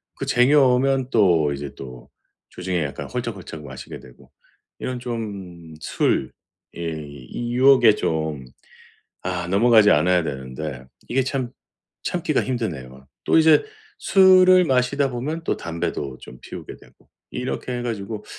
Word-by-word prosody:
그 - - -5
쟁여 140 +4 +4
오면 130 +1 +1
또 85 -9 +3
이제 70 0 -6
또 65 -2 -10 0.4
주중에 90 -3 -2
약간 70 - -5
홀짝홀짝 105 -11 -6
마시게 65 -1 -9
되고 60 - -18 0.5
이런 125 -1 -4
좀 100 -9 -6
술의 - - 0 0.5
이 80 - -6
유혹에 130 -4 +6
좀 80 -4 -2 0.8
아 90 -1 -2
넘어가지 110 +1 +5
않아야 90 -1 +3
되는데 65 -1 -6 0.2
이게 130 +2 +1
참 130 -3 -2 0.5
참기가 175 -4 0
힘드네요. 70 - -5 0.2
또 - - +3
이제 160 -1 +6 0.4
술을 185 -1 +6
마시다 135 0 +1
보면 150 +7 -4
또 - - 0
담배도 80 -5 -4
좀 65 - -12
피우게 - - -9
되고. - - -23 0.2
이렇게 125 0 -4
해 - - -4
가지고 110 -2 -5
105 Hz, 265 characters per minute, -22 LUFS, 75-125 Hz, 0.8 s, 유혹에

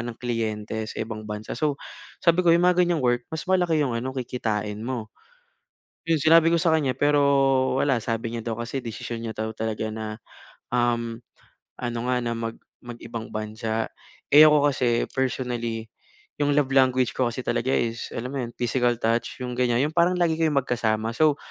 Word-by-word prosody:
ng 120 -1 -6
kliyente 110 -2 -2
sa - - -8
ibang 110 -1 -6
bansa 105 +2 -5
so, 145 0 0 0.4
sabi 175 0 +3
ko 170 - +6
yung 170 - +4
mga 180 0 +4
ganyang 170 -3 0
work 120 0 +2
mas 160 - -4
malaki 175 -4 +2
yung 130 -5 0
ano 130 +3 -3
kikitain 110 -4 -3
mo. 120 -4 -4 1.0
Iyon 165 -2 +2
sinabi 165 +1 +6
ko - - +4
sa 165 - +3
kanya 140 -5 +1
pero 145 0 +3 0.6
wala, 135 -4 +2
sabi 115 0 -3
niya 115 -1 -4
daw 115 - -1
kasi 120 +3 -3
desisyon 115 -1 -6
niya 110 - -4
daw 110 0 -3
talaga 110 0 -3
na, 110 0 -5 0.6
um, 120 -1 0 0.6
ano 120 -1 -3
nga 125 - +2
na 120 - -1
mag 115 0 -4 0.3
mag 120 -1 -7
ibang 115 -1 -6
bansa. 110 +1 -3 0.4
Eh 150 +2 +10
ako 145 -1 +4
kasi 120 -2 +1
personally, 120 -4 -2 0.5
yung 145 0 +2
love 140 -2 +2
language 130 -2 +3
ko 130 -2 +2
kasi 120 - -5
talaga 130 +3 0
is 115 0 -2
alam 125 +2 -4
mo 140 - -2
iyon 120 -1 -6
physical 120 0 +1
touch 115 +1 0
yung 125 - -4
ganyan? 125 +1 +2
Yung 150 - -2
parang 175 +1 +4
lagi 170 -2 +2
kayong 155 -3 +3
magkasama 110 -2 0
so, 155 -2 +4
120 Hz, 185 wpm, -25 LUFS, 115-140 Hz, 1.0 s, Eh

